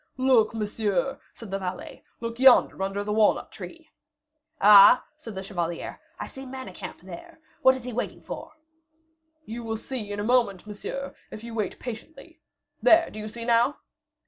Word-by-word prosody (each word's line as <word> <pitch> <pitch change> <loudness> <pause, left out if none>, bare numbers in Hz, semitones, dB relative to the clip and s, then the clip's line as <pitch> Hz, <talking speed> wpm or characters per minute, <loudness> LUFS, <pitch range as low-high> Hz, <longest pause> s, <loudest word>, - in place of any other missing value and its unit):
"Look, 255 -4 +3
monsieur," 220 +4 -1
said 225 -4 -11
the 195 - -2
valet, 185 -1 -6 0.2
"look 230 0 -5
yonder, 260 -6 +6
under 195 +1 -2
the 210 0 -2
walnut 215 -1 +2
tree." 330 -2 -11 0.7
"Ah?" 205 +3 +8
said 230 -9 -10
the 190 - -5
chevalier. 175 -4 -4 0.2
"I - - -4
see 270 - -10
Manicamp 255 -9 -8
there. 190 - -11 0.2
What 260 0 +6
is 260 - -8
he 250 0 -6
waiting 245 - -4
for?" - - -8 0.9
"You 235 +2 -6
will 225 -1 -3
see 220 -3 -6
in 205 - -4
a - - -2
moment, 225 -5 +1
monsieur, 215 +6 -6 0.2
if 215 - -9
you 235 0 -8
wait 215 -3 -3
patiently. 245 +6 -9 0.4
There, 330 0 +5
do 215 - -8
you 215 - -5
see 230 +2 -7
now?" 240 +4 +3
225 Hz, 170 wpm, -26 LUFS, 205-255 Hz, 0.9 s, Ah